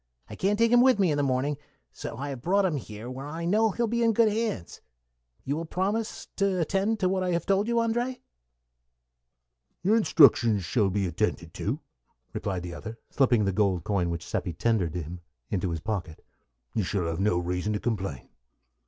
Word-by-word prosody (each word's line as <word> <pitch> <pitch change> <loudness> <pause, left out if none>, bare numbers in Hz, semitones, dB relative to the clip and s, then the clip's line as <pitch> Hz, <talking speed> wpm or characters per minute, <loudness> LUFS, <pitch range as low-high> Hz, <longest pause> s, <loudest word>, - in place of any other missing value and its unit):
I - - -6
can't 200 - +1
take 230 +1 +3
him 245 0 +7
with 255 -3 +5
me 190 -5 +3
in 145 - 0
the - - +2
morning, 135 +1 0
and - - -31 0.3
so - - -7
I 145 +2 -4
have 135 -3 -6
brought 195 +6 +2
him 165 -5 0
here, 110 -2 -8
where 130 +3 -6
I 165 +3 -5
know 215 +5 +3
he 210 - -8
will 235 - +3
be 235 +2 0
in 230 -1 +4
good 225 0 +4
hands. 215 - -3 0.6
You 140 - -1
will 165 +2 -3
promise 200 +6 -2
to 195 -2 +1
attend 195 +6 0
to 185 - +3
what 185 0 0
I 180 -1 0
have 170 - -1
told 195 +2 +2
you, 235 - 0
André?" 240 +2 0 1.6
"Your 205 +4 +4
instructions 120 - +5
shall 105 0 +2
be 100 +1 0
attended 85 -3 -2
to," - - -3 0.5
replied 95 -3 -3
the 90 -1 -6
other, 110 +5 -7
slipping 120 -6 +3
the 95 - +1
gold 95 -3 +1
coin 90 -4 0
which 85 -1 -4
Seppi 90 - -3
tendered 90 -2 0
him 85 +1 -5 0.3
into 95 -2 0
his 80 -2 -3
pocket. 95 -6 -4 0.5
"You - - +1
shall 95 -1 -1
have 85 0 -2
no 100 -3 +2
reason 90 +3 -1
to 105 - -1
complain." 95 - -3
135 Hz, 205 wpm, -27 LUFS, -, 1.6 s, him